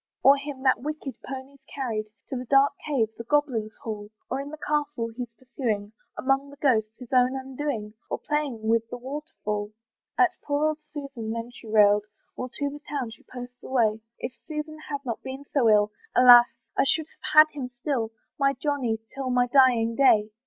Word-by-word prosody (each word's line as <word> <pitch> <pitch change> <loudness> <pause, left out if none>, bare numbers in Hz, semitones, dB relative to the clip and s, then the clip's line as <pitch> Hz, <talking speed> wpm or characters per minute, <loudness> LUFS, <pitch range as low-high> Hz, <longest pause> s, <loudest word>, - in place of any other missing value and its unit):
"Or 275 - +8
him 280 -1 -6
that 260 -2 +3
wicked 295 -1 -5
pony's 270 +1 -8
carried 225 -6 -3 0.2
"To - - -3
the 250 0 -4
dark 275 +3 +5
cave, 255 -8 +1
the - - -4
goblins' 240 -5 0
hall, 210 -2 -5 0.2
"Or 265 +2 0
in 280 - -7
the 310 - -8
castle 295 -6 -1
he's 245 -1 -5
pursuing, 225 -6 -3 0.2
"Among 270 +1 +1
the 285 - -12
ghosts, 230 -6 +1
his 250 0 -10
own 255 +1 +4
undoing; 265 -5 -4 0.2
"Or - - -1
playing 285 -8 -2
with 230 0 +2
the - - -5
waterfall." 245 -6 -5 0.4
At 365 -1 +4
poor 290 +1 +1
old 310 0 -3
Susan 280 -7 -7
then 230 +1 -4
she 235 - -13
railed, 210 -1 +5 0.3
While 255 - -5
to 285 +3 -2
the 290 +1 -9
town 270 -5 -2
she 220 - -13
posts 245 0 -9
away; 225 -4 +1 0.2
"If 245 - -5
Susan 310 0 -5
had 285 -1 -4
not 235 -3 -3
been 265 +2 -7
so 250 -6 +4
ill, 210 0 +4 0.2
"Alas! 245 -1 +9 0.3
I - - +4
should 310 +3 +2
have - - -8
had - - -31
him 270 -4 -4
still, 245 -2 -2 0.3
"My 275 0 +3
Johnny, 265 -5 -1 0.2
till 270 -1 -3
my 250 0 +3
dying 245 -3 +4
day." 220 -6 +4
255 Hz, 190 wpm, -26 LUFS, 230-285 Hz, 0.4 s, Alas